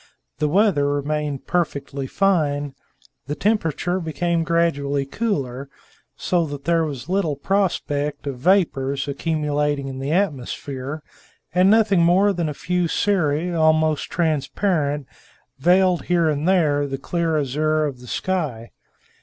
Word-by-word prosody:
The 150 Hz, -, +2 dB
weather 165 Hz, -5 st, +3 dB
remained 145 Hz, -1 st, -2 dB
perfectly 140 Hz, -5 st, -2 dB
fine, 145 Hz, -7 st, +1 dB, 0.5 s
the 145 Hz, -, -2 dB
temperature 180 Hz, -2 st, 0 dB
became 165 Hz, +1 st, -1 dB
gradually 145 Hz, -5 st, 0 dB
cooler, 140 Hz, -, -3 dB, 0.5 s
so 175 Hz, -3 st, 0 dB
that 145 Hz, -1 st, -7 dB
there 170 Hz, 0 st, +2 dB
was 140 Hz, -5 st, -5 dB
little 180 Hz, -5 st, 0 dB
prospect 150 Hz, -4 st, -1 dB
of 135 Hz, -3 st, -4 dB
vapors 140 Hz, -5 st, +1 dB
accumulating 145 Hz, -1 st, -1 dB
in 130 Hz, -1 st, -6 dB
the 135 Hz, +2 st, -3 dB
atmosphere; 145 Hz, -4 st, -2 dB, 0.5 s
and 180 Hz, +2 st, +4 dB
nothing 210 Hz, -4 st, +4 dB
more 190 Hz, +4 st, +4 dB
than 170 Hz, -4 st, -1 dB
a 150 Hz, -, -5 dB
few 180 Hz, +2 st, -1 dB
cirri, 175 Hz, -3 st, 0 dB
almost 155 Hz, -1 st, +2 dB
transparent, 155 Hz, -2 st, 0 dB, 0.5 s
veiled 180 Hz, +3 st, +3 dB
here 175 Hz, -2 st, +2 dB
and 150 Hz, +2 st, -1 dB
there 150 Hz, -6 st, +2 dB
the 135 Hz, -1 st, -4 dB
clear 165 Hz, +2 st, -1 dB
azure 155 Hz, +2 st, +1 dB
of 135 Hz, -4 st, -4 dB
the 125 Hz, -, -13 dB
sky. 145 Hz, -10 st, -3 dB
155 Hz, 130 wpm, -22 LUFS, 140-175 Hz, 0.5 s, and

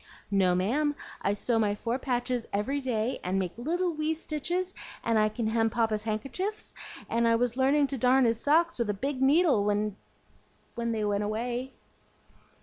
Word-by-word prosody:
"No, 190 Hz, -3 st, +3 dB
ma'am, 285 Hz, +11 st, +1 dB, 0.3 s
I 200 Hz, -, +1 dB
sew 225 Hz, +2 st, 0 dB
my 205 Hz, -2 st, +1 dB
four 235 Hz, +4 st, -2 dB
patches 245 Hz, -2 st, -1 dB
every 215 Hz, +8 st, 0 dB
day, 245 Hz, -1 st, -1 dB
and 185 Hz, +1 st, -1 dB
make 185 Hz, -2 st, -2 dB
little 340 Hz, +8 st, -1 dB
wee 310 Hz, +1 st, -1 dB
stitches, 350 Hz, +4 st, -2 dB, 0.3 s
and 230 Hz, -1 st, +2 dB
I 215 Hz, 0 st, +3 dB
can 225 Hz, +1 st, -3 dB
hem 225 Hz, 0 st, +2 dB
Papa's 220 Hz, -2 st, 0 dB
hank'chifs, 275 Hz, -, -3 dB, 0.3 s
and 230 Hz, +1 st, +1 dB
I 230 Hz, -, +4 dB
was 240 Hz, 0 st, 0 dB
learning 275 Hz, +3 st, +3 dB
to 265 Hz, -, -3 dB
darn 255 Hz, +2 st, +4 dB
his 230 Hz, -1 st, +2 dB
socks 325 Hz, +1 st, +2 dB
with 235 Hz, -3 st, 0 dB
a 205 Hz, -, 0 dB
big 270 Hz, +5 st, -3 dB
needle 285 Hz, -, +4 dB
when 205 Hz, 0 st, 0 dB, 0.8 s
when 235 Hz, -1 st, -2 dB
they 220 Hz, -2 st, -1 dB
went 205 Hz, 0 st, 0 dB
away." 240 Hz, +5 st, -3 dB
235 Hz, 175 wpm, -28 LUFS, 215-280 Hz, 0.8 s, I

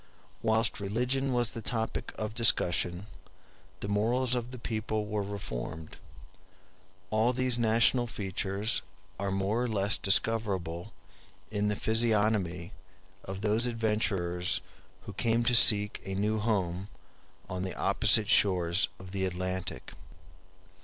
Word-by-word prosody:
Whilst 110 Hz, 0 st, +1 dB
religion 125 Hz, +7 st, -1 dB
was 120 Hz, -2 st, 0 dB
the 115 Hz, -, -7 dB
topic 110 Hz, 0 st, -3 dB
of 105 Hz, 0 st, -4 dB
discussion, 90 Hz, -5 st, +2 dB, 0.8 s
the -, -, -4 dB
morals 115 Hz, +5 st, +1 dB
of 120 Hz, -1 st, -2 dB
the 125 Hz, -, -9 dB
people 110 Hz, -2 st, -3 dB
were 105 Hz, 0 st, -2 dB
reformed. 80 Hz, -6 st, -6 dB, 1.1 s
All 110 Hz, +3 st, +2 dB
these 130 Hz, -1 st, 0 dB
national 115 Hz, +2 st, +3 dB
features 100 Hz, +1 st, -1 dB, 0.4 s
are 100 Hz, 0 st, -2 dB
more 95 Hz, +4 st, -1 dB
or 125 Hz, -, 0 dB
less 105 Hz, -2 st, +1 dB
discoverable 100 Hz, -4 st, 0 dB, 0.6 s
in 105 Hz, -1 st, -1 dB
the 105 Hz, -, 0 dB
physiognomy 105 Hz, -5 st, +1 dB, 0.5 s
of 95 Hz, +1 st, -6 dB
those 110 Hz, +3 st, +1 dB
adventurers 105 Hz, -6 st, -1 dB, 0.4 s
who 100 Hz, -, -10 dB
came 115 Hz, +3 st, 0 dB
to 120 Hz, +1 st, +2 dB
seek 105 Hz, -3 st, +7 dB
a 95 Hz, 0 st, -5 dB
new 105 Hz, +2 st, 0 dB
home 95 Hz, -4 st, -1 dB, 0.6 s
on 90 Hz, -1 st, -5 dB
the 95 Hz, 0 st, -4 dB
opposite -, -, +3 dB
shores 90 Hz, -2 st, +3 dB
of 95 Hz, -1 st, -12 dB
the 95 Hz, 0 st, -2 dB
Atlantic. 95 Hz, 0 st, -4 dB
105 Hz, 125 wpm, -29 LUFS, 95-115 Hz, 1.1 s, seek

